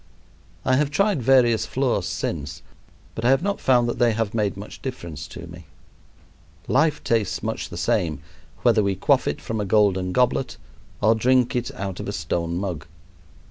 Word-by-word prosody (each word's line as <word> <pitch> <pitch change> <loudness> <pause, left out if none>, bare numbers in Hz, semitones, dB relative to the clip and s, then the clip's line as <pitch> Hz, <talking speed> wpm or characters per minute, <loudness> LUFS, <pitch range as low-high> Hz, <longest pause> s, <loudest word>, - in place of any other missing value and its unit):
I 130 -1 +3
have 145 0 +1
tried 195 +1 +1
various 120 -3 +4
floors 125 -9 0
since 70 -1 -4 0.5
but 115 - -6
I 120 - +3
have 135 +5 +3
not 200 0 -1
found 120 -2 +3
that 120 - -3
they 120 -2 +4
have 115 -1 -2
made 105 -4 0
much 100 +2 -9
difference 85 - -6
to - - -9
me. - - -12 1.0
Life 150 +3 +2
tastes 115 -3 0
much - - -3
the - - -8
same, 80 -3 0 0.4
whether 115 -3 +4
we 100 -1 0
quaff 95 - +2
it - - -1
from 110 -2 -3
a - - -1
golden 95 -2 +2
goblet 125 +5 +1 0.4
or 110 +2 +5
drink 125 +2 +2
it 120 -1 -1
out 95 -2 -5
of - - -5
a - - -3
stone 85 +1 -2
mug. 90 -5 -4
115 Hz, 180 wpm, -23 LUFS, 95-130 Hz, 1.0 s, or